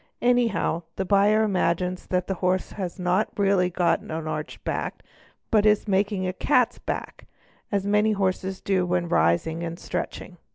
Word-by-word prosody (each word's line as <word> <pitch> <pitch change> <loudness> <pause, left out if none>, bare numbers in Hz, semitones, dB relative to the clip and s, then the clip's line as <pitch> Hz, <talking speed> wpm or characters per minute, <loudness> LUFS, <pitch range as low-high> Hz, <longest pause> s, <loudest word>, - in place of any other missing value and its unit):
Anyhow 240 -8 +2
the 190 - -2
buyer 205 +3 +4
imagines 180 -2 0
that 180 -1 0
the 195 - -2
horse 185 0 0
has 185 -4 -5
not— 180 +3 +1
really 195 -3 +3
got 175 -1 +1
an - - -14
arched 155 -1 -5
back - - -2
and - - -30 0.5
that 215 -2 +4
he - - +7
is 210 0 +3
only 210 - -3
making 195 0 +1
a 185 - -2
"'cat's 245 +2 +2
back", - - -5 0.4
as 200 -1 0
many 210 +1 +3
horses 190 -1 -1
do 190 -2 +1
when 175 -1 0
rising 85 - +2
and 170 0 -4
stretching. 180 0 -5
190 Hz, 175 wpm, -25 LUFS, 175-205 Hz, 0.5 s, he